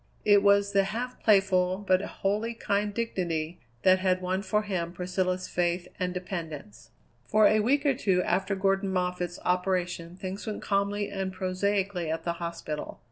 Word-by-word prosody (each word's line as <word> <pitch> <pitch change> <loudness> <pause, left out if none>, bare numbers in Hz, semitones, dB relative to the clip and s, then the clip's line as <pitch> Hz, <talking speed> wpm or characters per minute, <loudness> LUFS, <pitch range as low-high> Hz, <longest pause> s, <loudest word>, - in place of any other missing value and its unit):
It 205 -1 +6
was 200 0 +4
the 195 -1 +3
half 240 +5 -4
playful, 190 -3 +3
but 185 0 +4
wholly 210 +4 -2
kind 205 -1 0
dignity 175 -7 -2 0.2
that 185 0 +6
had 185 -1 +2
won 185 +1 -1
for 210 +1 0
him 175 -4 -3
Priscilla's 185 0 -1
faith 175 0 -1
and 180 0 0
dependence. 160 - -6 0.4
For 215 0 +4
a 215 - +5
week 280 +7 +2
or 280 - +4
two 190 -8 +1
after 195 +1 0
Gordon 195 0 +1
Moffatt's 180 -1 -1
operation 180 -2 -1
things 190 +3 -6
went 215 - -4
calmly 200 0 0
and 190 -1 -2
prosaically 185 -1 -1
at 160 +1 -2
the 170 - -1
hospital. 170 -3 -5
185 Hz, 160 wpm, -28 LUFS, 180-200 Hz, 0.4 s, It